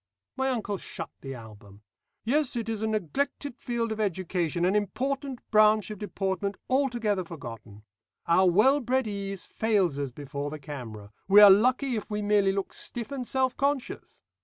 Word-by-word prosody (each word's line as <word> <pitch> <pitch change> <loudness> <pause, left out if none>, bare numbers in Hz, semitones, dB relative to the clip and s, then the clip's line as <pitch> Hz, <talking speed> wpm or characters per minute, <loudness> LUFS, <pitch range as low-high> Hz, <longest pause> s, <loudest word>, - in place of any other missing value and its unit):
My 265 0 0
uncle 210 -6 -2
shut - - -7
the 135 -1 -6
album. 105 -3 -13 0.4
"Yes, 280 +3 +1
it 230 -2 -3
is 220 -2 -3
a 220 - 0
neglected 230 - -2
field 235 -2 -2
of 220 - -4
education, 175 -4 -1
an 190 +3 +2
important 265 +5 -2
branch 215 -1 +4
of 210 - -7
deportment 195 0 -2
altogether 240 -7 +1
forgotten. 115 - -10 0.4
Our 180 +2 +4
well 220 +11 +4
bred 260 0 0
ease 195 -2 -4
fails 195 -10 +1
us 140 -1 -2
before 140 +2 -5
the 155 - -6
camera; 120 -8 -8 0.2
we 200 +2 +8
are 205 -1 +11
lucky 255 +5 +3
if 210 - -6
we 210 0 -2
merely 205 -1 +3
look 195 0 -3
stiff 240 +2 -5
and 260 -3 -4
self 260 -1 0
conscious. 280 -2 -2
205 Hz, 165 wpm, -27 LUFS, 170-240 Hz, 0.4 s, are